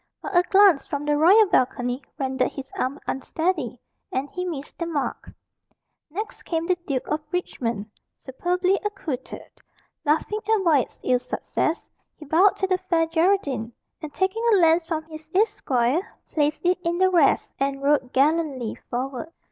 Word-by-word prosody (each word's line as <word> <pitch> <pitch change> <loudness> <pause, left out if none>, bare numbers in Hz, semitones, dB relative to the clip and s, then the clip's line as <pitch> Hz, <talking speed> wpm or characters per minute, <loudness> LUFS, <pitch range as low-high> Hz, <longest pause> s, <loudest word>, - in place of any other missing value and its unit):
But 395 - -6
a 350 - +7
glance 385 -4 +5
from 285 0 -3
the 295 0 +2
royal 375 +9 +6
balcony 250 -5 0 0.2
rendered 260 -2 0
his 270 -1 -8
arm 265 +3 -2
unsteady, 290 -3 -2 0.3
and 265 +2 -1
he 360 0 -4
missed 300 -5 -6
the 335 - -2
mark. 300 -5 -3 0.8
Next 415 +8 -6
came 330 -1 -2
the 365 +1 +2
Duke 265 -3 -2
of 305 +1 -1
Richmond, 235 - -2 0.3
superbly 360 +8 0
accoutred. 325 -11 -5 0.5
Laughing 320 +8 +1
at 440 -3 +3
Wyat's 300 -6 +2
ill 250 -1 +2
success, 255 +5 -2 0.2
he 305 - -12
bowed 345 +7 +4
to 385 - -1
the 370 -1 +1
Fair 340 -3 +1
Geraldine, 320 - 0 0.3
and 310 -2 -6
taking 380 +7 -1
a - - +7
lance 335 -2 +4
from 320 -2 -2
his 315 0 -11
esquire, 275 - +2 0.3
placed 300 +2 0
it 360 +1 +3
in 340 +1 0
the 375 0 +3
rest, 330 -6 +3
and 275 0 -1
rode 280 -3 +2
gallantly 280 -4 +1
forward. 260 +5 -4
315 Hz, 155 wpm, -24 LUFS, 270-360 Hz, 0.8 s, a